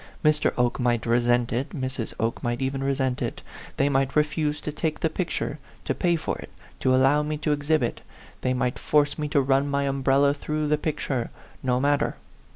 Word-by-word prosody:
Mr. 150 Hz, 0 st, +3 dB
Oke 125 Hz, -1 st, +1 dB
might 120 Hz, -2 st, +1 dB
resent 120 Hz, 0 st, +2 dB
it, 125 Hz, +4 st, -1 dB
Mrs. 130 Hz, -4 st, -4 dB
Oke 115 Hz, +1 st, -1 dB, 0.2 s
even 135 Hz, 0 st, -1 dB
might 135 Hz, -, -1 dB
resent 130 Hz, -2 st, 0 dB
it; -, -, -3 dB, 0.3 s
they 140 Hz, -, +3 dB
might 135 Hz, -1 st, +1 dB
refuse 150 Hz, 0 st, +1 dB
to 150 Hz, -, -4 dB
take 155 Hz, +1 st, -2 dB
the 160 Hz, -, 0 dB
picture, 165 Hz, -4 st, -2 dB, 0.3 s
to -, -, 0 dB
pay 175 Hz, -1 st, +1 dB
for 160 Hz, -, -3 dB
it, -, -, -9 dB, 0.3 s
to 130 Hz, 0 st, +3 dB
allow 135 Hz, +3 st, +4 dB
me 150 Hz, 0 st, -2 dB
to 150 Hz, 0 st, -1 dB
exhibit; 145 Hz, -3 st, 0 dB, 0.4 s
they 130 Hz, 0 st, +1 dB
might 125 Hz, 0 st, -1 dB
force 145 Hz, 0 st, +2 dB
me 150 Hz, -, -1 dB
to 145 Hz, 0 st, +2 dB
run 135 Hz, +1 st, +2 dB
my 140 Hz, 0 st, +1 dB
umbrella 140 Hz, +1 st, +3 dB
through 150 Hz, +1 st, -2 dB
the 150 Hz, 0 st, +2 dB
picture. 140 Hz, -5 st, -2 dB, 0.3 s
No 125 Hz, -1 st, +1 dB
matter. 145 Hz, +2 st, +1 dB
140 Hz, 190 wpm, -25 LUFS, 130-150 Hz, 0.4 s, allow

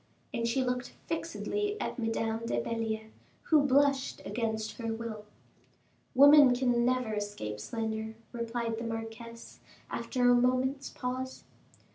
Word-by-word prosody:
And 230 Hz, 0 st, 0 dB
she 260 Hz, +3 st, +1 dB
looked 250 Hz, 0 st, -2 dB
fixedly 415 Hz, 0 st, -2 dB
at -, -, -3 dB
Madame 225 Hz, 0 st, -1 dB
de 120 Hz, -, 0 dB
Belliere, 220 Hz, -, -3 dB, 0.3 s
who 310 Hz, -2 st, +5 dB
blushed 280 Hz, 0 st, +2 dB
against 220 Hz, 0 st, -2 dB
her 230 Hz, -1 st, -2 dB
will. 225 Hz, -2 st, -5 dB, 0.9 s
"Women 285 Hz, -1 st, +8 dB
can 245 Hz, -1 st, +2 dB
never 250 Hz, -2 st, +1 dB
escape 205 Hz, -, -4 dB
slander," 220 Hz, -, -3 dB, 0.2 s
replied 235 Hz, -1 st, -3 dB
the -, -, -4 dB
marquise, 230 Hz, +1 st, -7 dB, 0.3 s
after 250 Hz, -2 st, 0 dB
a 245 Hz, -, +7 dB
moment's 255 Hz, +3 st, +2 dB
pause. 255 Hz, +1 st, -4 dB
235 Hz, 125 wpm, -31 LUFS, 225-255 Hz, 0.9 s, Women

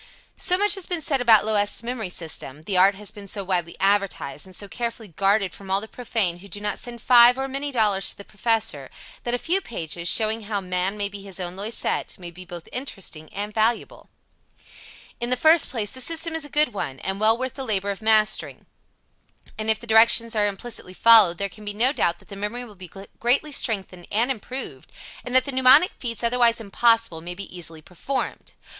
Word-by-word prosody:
So 360 Hz, -, +2 dB
much 415 Hz, +2 st, +3 dB
has 390 Hz, -3 st, -4 dB
been 355 Hz, -2 st, -2 dB
said 275 Hz, -3 st, +1 dB
about 225 Hz, -4 st, +5 dB
Loisette's 210 Hz, 0 st, +1 dB
memory 230 Hz, -5 st, -4 dB
system, 155 Hz, -4 st, -3 dB
the 195 Hz, +3 st, -3 dB
art 190 Hz, +2 st, +5 dB
has 205 Hz, +1 st, -4 dB
been 205 Hz, -2 st, -11 dB
so 200 Hz, +1 st, -4 dB
widely 180 Hz, -3 st, -2 dB
advertised, 195 Hz, -5 st, 0 dB
and 185 Hz, -, -11 dB
so 200 Hz, -, -7 dB
carefully 230 Hz, -1 st, -5 dB
guarded 195 Hz, +1 st, +1 dB
from 195 Hz, -1 st, -12 dB
all 195 Hz, +1 st, +2 dB
the 220 Hz, -, -9 dB
profane 220 Hz, -8 st, -2 dB
who 200 Hz, -, -13 dB
do 200 Hz, +1 st, -5 dB
not 210 Hz, 0 st, -3 dB
send 235 Hz, -2 st, -7 dB
five 245 Hz, 0 st, +7 dB
or 270 Hz, 0 st, -2 dB
many 275 Hz, +2 st, -3 dB
dollars 210 Hz, -6 st, +2 dB
to -, -, -5 dB
the 200 Hz, -, -11 dB
Professor, 215 Hz, -, -1 dB, 0.4 s
that 240 Hz, 0 st, 0 dB
a -, -, -1 dB
few 355 Hz, +9 st, 0 dB
pages, 170 Hz, -, -4 dB
showing 220 Hz, +2 st, +2 dB
how 205 Hz, -1 st, -2 dB
man 185 Hz, +1 st, -2 dB
may 205 Hz, -1 st, -1 dB
be 200 Hz, 0 st, -9 dB
his 195 Hz, -1 st, -8 dB
own 180 Hz, 0 st, -5 dB
Loisette, 210 Hz, +4 st, -1 dB
may 175 Hz, -2 st, -9 dB
be 180 Hz, +2 st, -11 dB
both 175 Hz, -1 st, -10 dB
interesting 195 Hz, -, -6 dB
and 205 Hz, +1 st, -5 dB
valuable. 225 Hz, +2 st, -1 dB, 1.1 s
In 240 Hz, -, -2 dB
the 250 Hz, -, +2 dB
first 315 Hz, +4 st, +5 dB
place, 215 Hz, -5 st, -3 dB
the 260 Hz, -, -5 dB
system 330 Hz, +3 st, +1 dB
is 320 Hz, -2 st, -2 dB
a -, -, -10 dB
good 295 Hz, -2 st, +2 dB
one, 135 Hz, -9 st, -5 dB
and 195 Hz, +1 st, -4 dB
well 220 Hz, +2 st, +3 dB
worth 255 Hz, 0 st, -4 dB
the 270 Hz, -, -7 dB
labor 200 Hz, -4 st, -1 dB
of 200 Hz, -, -7 dB
mastering, 215 Hz, -1 st, +1 dB, 0.9 s
and 215 Hz, 0 st, 0 dB
if 220 Hz, -, +4 dB
the -, -, -10 dB
directions 230 Hz, +1 st, +4 dB
are 210 Hz, -1 st, +3 dB
implicitly 200 Hz, -2 st, -5 dB
followed 215 Hz, -7 st, +7 dB
there 200 Hz, -, -1 dB
can 210 Hz, +2 st, -14 dB
be 205 Hz, 0 st, -4 dB
no 250 Hz, +6 st, +3 dB
doubt 170 Hz, -, 0 dB
that -, -, -22 dB
the 200 Hz, -, -8 dB
memory 210 Hz, +5 st, -4 dB
will 220 Hz, -, -14 dB
be 185 Hz, -3 st, -12 dB, 0.3 s
greatly 265 Hz, +6 st, +2 dB
strengthened 195 Hz, -9 st, -2 dB
and 235 Hz, +5 st, +2 dB
improved, 245 Hz, -, -5 dB, 0.3 s
and 250 Hz, 0 st, -5 dB
that 260 Hz, 0 st, +5 dB
the 280 Hz, -, -4 dB
mnemonic 260 Hz, +6 st, +5 dB
feats 235 Hz, -2 st, -5 dB
otherwise 235 Hz, -1 st, +3 dB
impossible 225 Hz, -4 st, +1 dB
may 175 Hz, +2 st, -7 dB
be 195 Hz, -1 st, -8 dB
easily 165 Hz, -3 st, -7 dB
performed. 195 Hz, -, -5 dB
215 Hz, 215 wpm, -23 LUFS, 195-245 Hz, 1.1 s, five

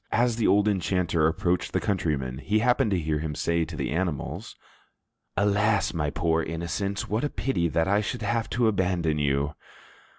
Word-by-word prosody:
As 120 Hz, 0 st, +2 dB
the 115 Hz, -, +2 dB
old 105 Hz, +1 st, +4 dB
enchanter 90 Hz, -5 st, +1 dB
approached 85 Hz, +2 st, 0 dB
the -, -, +2 dB
countryman, 70 Hz, -10 st, -1 dB
he 105 Hz, +7 st, 0 dB
happened 125 Hz, +2 st, +3 dB
to 95 Hz, -3 st, +1 dB
hear 75 Hz, -1 st, -1 dB
him 75 Hz, -1 st, -3 dB
say 85 Hz, +1 st, 0 dB
to -, -, -8 dB
the -, -, -3 dB
animals, 85 Hz, -3 st, -3 dB, 0.8 s
"Alas, 105 Hz, 0 st, +2 dB
my 75 Hz, -3 st, -1 dB
poor 80 Hz, +1 st, +1 dB
innocents, 85 Hz, +5 st, -3 dB
what 110 Hz, +5 st, -1 dB
a 145 Hz, -, 0 dB
pity 90 Hz, -14 st, -1 dB
that 80 Hz, +1 st, +1 dB
I 100 Hz, +2 st, +3 dB
should 110 Hz, +2 st, -4 dB
have 115 Hz, +2 st, -1 dB
to 120 Hz, -1 st, +2 dB
abandon 90 Hz, -6 st, +1 dB
you!" 70 Hz, 0 st, 0 dB
90 Hz, 175 wpm, -26 LUFS, 80-105 Hz, 0.8 s, old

